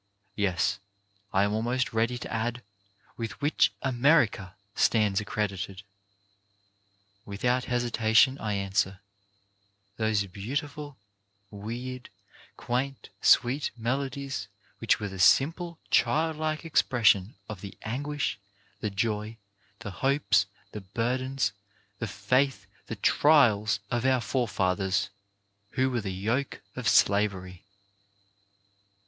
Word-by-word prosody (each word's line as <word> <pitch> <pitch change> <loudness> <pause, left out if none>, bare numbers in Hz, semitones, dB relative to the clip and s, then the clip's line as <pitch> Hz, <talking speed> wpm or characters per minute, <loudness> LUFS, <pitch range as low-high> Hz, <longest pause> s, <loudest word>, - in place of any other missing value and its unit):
Yes, 95 0 0 0.5
I 95 - +3
am 105 +1 0
almost 120 +3 -1
ready 115 +2 +1
to - - -7
add, 120 +2 -2 0.5
with 115 -1 -5
which 105 -10 +3
America 120 - +2 0.2
stands 105 -3 +2
accredited? 100 -2 -3 1.4
Without 125 +5 -1
hesitation 120 +1 +3
I 105 -2 -2
answer: 100 -1 0 0.5
— 100 0 -43
Those 110 -2 +1
beautiful, 145 - -5 0.5
weird, 120 +5 -6 0.5
quaint, 130 +3 -3
sweet 130 +4 +4
melodies 130 -1 -3 0.3
which - - +2
were 105 - -3
the 95 -1 -8
simple, 165 - +3
child 160 +1 +2
like 155 +1 -2
expression 115 - +3
of 105 -4 -7
the 100 -1 -9
anguish, 145 +2 -2 0.4
the 105 - -2
joy, 105 +2 -2 0.4
the 105 -3 -5
hopes, 110 -3 +2 0.2
the 105 - -7
burdens, 125 +7 -1 0.5
the 115 - -2
faith, 120 +2 0 0.2
the - - -4
trials 115 -9 +4
of 120 -1 0
our 130 -1 +3
forefathers 100 -4 0 0.6
who 130 0 +1
wore 120 -2 -1
the 100 - -4
yoke 110 +9 -2
of 130 -3 -3
slavery. 100 -4 +2
115 Hz, 105 wpm, -28 LUFS, 100-130 Hz, 1.4 s, sweet